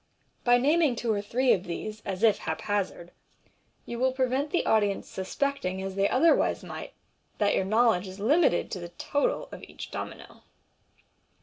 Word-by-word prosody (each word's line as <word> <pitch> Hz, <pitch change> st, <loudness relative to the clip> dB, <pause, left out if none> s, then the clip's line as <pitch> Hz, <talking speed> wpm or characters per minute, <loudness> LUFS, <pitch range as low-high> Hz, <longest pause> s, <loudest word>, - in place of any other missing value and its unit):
By 245 Hz, 0 st, +5 dB
naming 295 Hz, +1 st, +3 dB
one 225 Hz, -2 st, 0 dB
or 205 Hz, -, -1 dB
two 250 Hz, +5 st, +2 dB
of 185 Hz, -, -1 dB
these, 215 Hz, +5 st, -5 dB
as 190 Hz, +1 st, -4 dB
if 220 Hz, -3 st, +5 dB
hap 160 Hz, -1 st, -4 dB
hazard, 195 Hz, -4 st, -2 dB, 0.7 s
you 235 Hz, -, -5 dB
will 260 Hz, +1 st, +2 dB
prevent 260 Hz, +2 st, 0 dB
the 350 Hz, -, 0 dB
audience 205 Hz, -2 st, +1 dB
suspecting, 190 Hz, -1 st, -2 dB
as 195 Hz, 0 st, -4 dB
they 195 Hz, +1 st, +1 dB
otherwise 320 Hz, +6 st, +3 dB
might, -, -, -8 dB, 0.4 s
that 205 Hz, -1 st, +2 dB
four -, -, +1 dB
knowledge 215 Hz, -2 st, +3 dB
is 190 Hz, +1 st, -9 dB
limited 270 Hz, -, +2 dB
to 185 Hz, -, -3 dB
the 175 Hz, -1 st, -7 dB
total 285 Hz, -, -1 dB
of -, -, -9 dB
each -, -, -9 dB
domino. -, -, -7 dB
215 Hz, 170 wpm, -28 LUFS, 190-260 Hz, 0.7 s, By